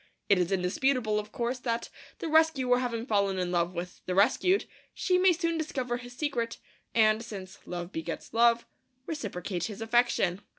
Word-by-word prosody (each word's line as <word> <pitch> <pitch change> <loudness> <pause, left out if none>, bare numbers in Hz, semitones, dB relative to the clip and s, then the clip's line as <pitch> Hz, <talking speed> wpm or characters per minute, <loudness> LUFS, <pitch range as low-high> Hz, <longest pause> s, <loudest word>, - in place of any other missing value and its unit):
It 200 -2 +5
is 180 +1 0
indisputable, 210 +4 +1
of 210 0 -7
course, 245 +1 -2
that, 235 -1 -2 0.3
the - - -4
rescuer 305 -6 +4
having 235 -2 -2
fallen 200 -4 +1
in 180 -1 -1
love 175 0 0
with 175 +1 -6
the 180 - -1
rescued, 265 - +3 0.3
she 365 -1 +2
may 375 0 +6
soon 335 -1 0
discover 255 -6 -2
his 245 0 -10
secret, 245 -6 -2 0.4
and, 220 0 +4
since 195 -4 -8
love 175 0 -5
begets 160 +1 -5
love, 235 0 +4 0.4
reciprocate 195 - -3
his 210 -1 -6
affection. 225 -5 +2
230 Hz, 165 wpm, -29 LUFS, 190-255 Hz, 0.4 s, may